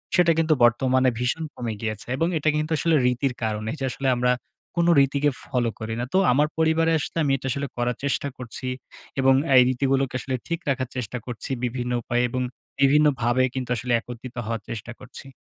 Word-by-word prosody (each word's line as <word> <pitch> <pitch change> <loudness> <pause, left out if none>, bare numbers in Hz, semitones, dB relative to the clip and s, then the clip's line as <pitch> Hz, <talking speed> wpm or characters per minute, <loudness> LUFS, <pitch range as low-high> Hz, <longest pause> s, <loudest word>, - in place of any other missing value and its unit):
সেটা 175 -2 +5
কিন্তু 160 -1 +3
বর্তমানে 130 +2 +4
ভীষণ 125 +6 -1
কমে 115 -3 -3
গিয়েছে। 110 -1 -4
এবং 165 - +1
এটা 155 +1 +1
কিন্তু 155 +1 -1
আসলে 165 0 +2
রীতির 125 +1 +1
কারনে। 110 0 -2
এইযে 135 -4 -3
আসলে 135 - -3
আমরা 125 +1 +2 0.4
কোনো 170 0 +3
রীতিকে 140 +1 +3 0.2
ফলো 120 -2 0
করি 110 +1 -4
না। 120 - -1
তো - - +4
আমার 145 +4 +3
পরিবারে 160 0 +3
আসলে 155 - -5
আমি 140 - +1
এটা 135 - -6
আসলে 140 +2 -2
করার 120 0 0
চেষ্টা 140 0 0
করছি 125 +1 -6 0.5
এবং 135 0 +5 0.2
এই 125 - +9
রীতিগুলোকে 135 0 0
আসলে 130 0 -3
ঠিক 170 0 -2
রাখার 130 -2 -1
চেষ্টা 125 0 -3
করছি 120 0 -6
বিভিন্ন 125 0 -2
উপায়ে 120 +1 0
এবং 130 +2 -2 0.4
বিভিন্নভাবে 135 -4 +4
কিন্তু 130 -2 -4
আসলে 120 +1 -3
একত্রিত 120 +1 -9
হওয়ার 115 -1 -3
চেষ্টা 115 +1 -6
করছি। 130 +2 -10
130 Hz, 185 wpm, -24 LUFS, 120-140 Hz, 0.5 s, এই